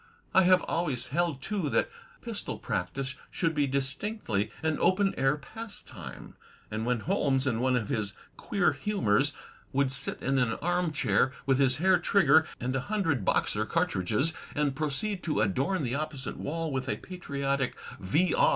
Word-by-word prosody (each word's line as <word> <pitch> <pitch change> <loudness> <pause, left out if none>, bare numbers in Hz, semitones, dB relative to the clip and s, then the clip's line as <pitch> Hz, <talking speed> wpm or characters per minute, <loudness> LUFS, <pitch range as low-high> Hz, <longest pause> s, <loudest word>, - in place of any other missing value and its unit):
I 190 - +6
have 185 -1 +5
always 150 -8 -1
held, 160 -3 0
too, 195 -8 -1
that - - +2 0.4
pistol - - -4
practice 130 +10 -3 0.2
should 165 -2 0
be 145 -2 +2
distinctly 135 - -1
an 160 -1 +1
open 195 +1 +3
air 135 +2 +2
pastime; 145 - -9 0.4
and 110 +2 -2
when 125 -2 +1
Holmes, 140 - +1
in 115 -4 +1
one 130 +1 +2
of 115 -4 -1
his 105 -7 -1 0.2
queer 195 -3 +1
hiunors 145 - +2 0.4
would 140 -1 +2
sit 135 0 -3
in 135 0 +2
an 120 -3 +2
arm 175 0 0
chair 140 -3 +2
with 135 -1 +3
his 130 -2 +4
hair 185 +2 +4
trigger 160 -4 +5
and 125 +2 -2
a - - +2
hundred 165 - +1
Boxer - - +1
cartridges, 105 - +1 0.2
and 145 -2 +1
proceed 155 +7 -1
to 155 - -1
adorn 135 - +1
the 120 -2 -1
opposite 145 -2 -3
wall 165 +1 -3
with 130 -1 -2
a - - 0
patriotic 140 -7 -2 0.2
V. 150 - +2
140 Hz, 160 wpm, -29 LUFS, 130-175 Hz, 0.4 s, I